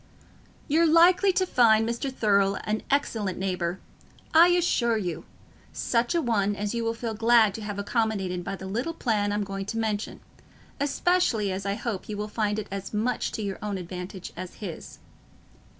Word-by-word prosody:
"You're 325 +3 +4
likely 350 +4 +5
to 370 - +2
find 225 -7 +4
Mr. 235 +4 -2
Thurle 200 -5 +2
an 215 +1 -1
excellent 220 -9 0
neighbour, 180 -1 -2 0.5
I 330 +2 +8
assure 335 -10 +2
you—such 230 - -3
a 335 - +1
one 205 -4 +1
as 205 +1 -3
you 235 -1 -1
will 230 0 -1
feel 230 -1 -4
glad 225 -1 +4
to 220 - -7
have 205 -1 -5
accommodated 200 -4 -1
by 195 +2 -4
the 190 - -9
little 240 +12 -3
plan 210 -7 0
I'm 205 0 0
going 195 0 -5
to 225 - -3
mention, 215 -2 -2 0.6
especially 280 - +1
as 190 +1 -4
I 200 - 0
hope 220 -4 -4
you 210 - -4
will 210 +1 -3
find 210 -1 -1
it 215 -1 -4
as 195 +1 -5
much 235 +4 -1
to 220 - -3
your 195 -1 -4
own 205 -2 -3
advantage 180 +1 -7
as 185 0 -7
his." 190 -6 -8
215 Hz, 175 wpm, -26 LUFS, 195-240 Hz, 0.6 s, I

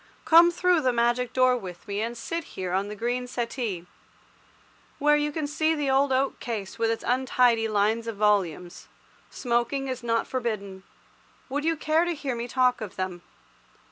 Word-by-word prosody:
Come 335 +1 +7
through 355 -1 +2
the 260 -3 +2
magic 240 +1 +1
door 255 0 +3
with 185 -6 -8
me, 200 0 -2
and 235 +2 -3
sit 335 +7 -4
here 185 -1 -3
on 195 +2 0
the 210 - -6
green 245 +3 -2
settee, 235 -7 -3 1.1
where 295 +1 +4
you 295 0 0
can 310 0 -3
see 315 +2 0
the 290 -3 0
old 270 +1 +3
oak 265 +1 0
case 215 -3 -5
with 225 0 +2
its 225 - -2
untidy 245 -2 +2
lines 215 +2 +1
of 225 - -4
volumes. 190 -5 0 0.4
Smoking 245 +3 -1
is 255 -1 -4
not 230 -1 0
forbidden. 215 -6 -4 0.7
Would 290 +3 -2
you 325 0 +1
care 310 +2 +2
to 345 -1 -1
hear 280 -3 -3
me 235 +1 -4
talk 250 -1 +2
of 210 -4 -6
them? 185 -2 -4
240 Hz, 175 wpm, -26 LUFS, 215-275 Hz, 1.1 s, Come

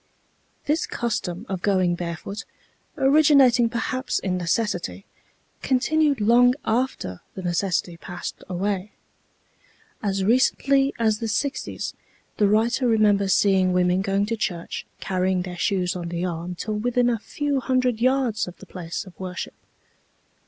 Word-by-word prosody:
This 305 +3 0
custom 215 -5 -3
of 190 -2 -4
going 185 -3 +2
barefoot, 175 +4 -5 0.5
originating 270 -4 +5
perhaps 255 +2 -2
in 185 -2 -1
necessity, 175 - -1 0.6
continued 285 +2 +2
long 240 +4 +5
after 225 - -1
the 190 - -6
necessity 175 -1 -1
passed 175 +1 -7
away. 195 +2 -2 1.1
As 195 -2 -1
recently 270 +5 +3
as 220 -3 +1
the 230 - -2
sixties, 270 +6 -2 0.4
the 205 - +4
writer 230 +5 +2
remembers 205 -4 +3
seeing 190 -2 +3
women 180 +1 +2
going 195 0 +1
to 230 +2 -2
church 175 -6 -4
carrying 185 -1 0
their 180 -1 -6
shoes 180 0 0
on 175 -2 -4
the 170 +1 -2
arm 175 0 -4
till 215 +5 -4
within 245 +2 +1
a 235 -2 +1
few 285 +4 -2
hundred 255 -3 +1
yards 255 -5 +1
of 175 -1 -9
the - - -13
place 170 -1 -6
of 185 - -13
worship. 185 -1 -5
205 Hz, 135 wpm, -24 LUFS, 180-245 Hz, 1.1 s, originating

